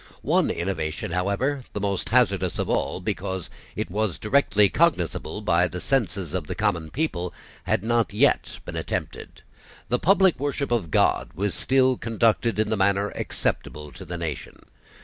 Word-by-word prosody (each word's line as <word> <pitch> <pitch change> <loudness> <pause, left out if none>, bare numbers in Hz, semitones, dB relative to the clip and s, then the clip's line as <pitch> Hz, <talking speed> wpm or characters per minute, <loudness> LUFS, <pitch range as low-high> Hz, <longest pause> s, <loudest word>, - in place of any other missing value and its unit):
One - - +2
innovation, 85 -3 -3
however, 100 +10 0
the - - -3
most 100 -1 -2
hazardous 100 -7 +2
of - - -1
all, - - 0
because 95 -2 -3 0.2
it - - -3
was 105 -3 -1
directly 105 -4 +3
cognisable 105 - 0
by 90 -3 +3
the 90 +1 -6
senses 95 - -1
of 90 -5 -2
the - - -4
common 90 -7 0
people, 90 - -2 0.3
had - - +1
not 115 -1 +1
yet 105 - +2
been - - -6
attempted. - - -5 0.5
The 125 - +1
public 190 -3 +4
worship 140 -1 -2
of 110 -9 0
God - - +2
was 100 +4 -1
still 130 -1 +2
conducted 115 -1 +1
in 110 0 +1
the 110 - +1
manner 100 +1 +2
acceptable 75 -1 -3
to 95 - -10
the 85 0 -6
nation. 80 -4 -6
100 Hz, 160 wpm, -25 LUFS, 90-120 Hz, 0.5 s, public